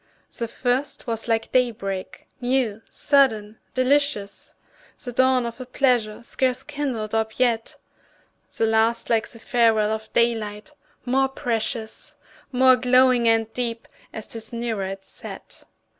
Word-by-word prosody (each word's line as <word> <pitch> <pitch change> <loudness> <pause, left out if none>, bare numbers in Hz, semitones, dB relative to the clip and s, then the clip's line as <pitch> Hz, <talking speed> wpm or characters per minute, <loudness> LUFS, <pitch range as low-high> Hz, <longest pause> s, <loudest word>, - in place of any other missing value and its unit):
The 235 - -2
first 255 +4 -2
was 225 -1 -3
like 225 -1 0
day 250 -1 +4
break, 195 -4 -6
new, 245 -4 0
sudden, 225 -7 +2 0.2
delicious, 255 -5 0 0.5
The 250 - -5
dawn 260 0 +3
of 235 +2 -6
a - - -6
pleasure 245 -4 +1
scarce 255 +1 -1
kindled 265 -8 -3
up 220 0 -1
yet; 235 -3 +1 0.8
The 225 - +2
last 225 +2 +2
like 225 -1 +2
the 230 - -10
farewell 225 -2 +2
of 220 0 -4
daylight, 225 +2 0 0.3
more 265 +2 +2
precious, 225 -3 -3 0.4
More 260 0 +5
glowing 250 -1 +4
and 225 -1 +2
deep, 235 -1 -3 0.2
as 220 - -6
'tis 225 -1 -7
nearer 230 -4 -2
its 195 0 -7
set. - - -10
235 Hz, 135 wpm, -23 LUFS, 220-255 Hz, 0.8 s, More